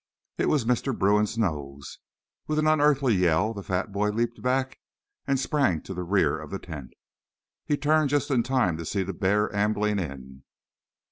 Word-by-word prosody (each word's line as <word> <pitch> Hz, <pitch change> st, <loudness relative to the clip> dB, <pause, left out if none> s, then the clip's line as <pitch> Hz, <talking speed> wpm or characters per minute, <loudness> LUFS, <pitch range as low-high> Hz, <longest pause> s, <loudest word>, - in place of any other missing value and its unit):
It -, -, +1 dB
was 145 Hz, -7 st, +1 dB
Mr. 125 Hz, +2 st, 0 dB
Bruin's 105 Hz, +3 st, +2 dB
nose. 70 Hz, -9 st, -3 dB, 0.5 s
With 155 Hz, -, -1 dB
an 155 Hz, -, +2 dB
unearthly 145 Hz, -5 st, +3 dB
yell, 90 Hz, +3 st, +2 dB
the 100 Hz, -, -6 dB
fat 95 Hz, +1 st, -2 dB
boy 105 Hz, +1 st, 0 dB
leaped 115 Hz, +2 st, -2 dB
back 130 Hz, +1 st, -1 dB, 0.5 s
and 135 Hz, -1 st, +1 dB
sprang 135 Hz, -, +1 dB
to 95 Hz, -, -7 dB
the 90 Hz, -, -4 dB
rear 90 Hz, -3 st, +1 dB
of 80 Hz, -, -9 dB
the 95 Hz, -, -4 dB
tent. 75 Hz, -8 st, -9 dB, 0.7 s
He 145 Hz, -, +1 dB
turned 155 Hz, 0 st, +2 dB
just 145 Hz, 0 st, 0 dB
in 125 Hz, -3 st, +3 dB
time 120 Hz, -9 st, +1 dB
to 85 Hz, -, -6 dB
see 95 Hz, +4 st, -1 dB
the 95 Hz, +1 st, -5 dB
bear 105 Hz, +4 st, 0 dB
ambling 105 Hz, 0 st, +1 dB
in. 65 Hz, -5 st, -7 dB
105 Hz, 180 wpm, -26 LUFS, 90-130 Hz, 0.7 s, unearthly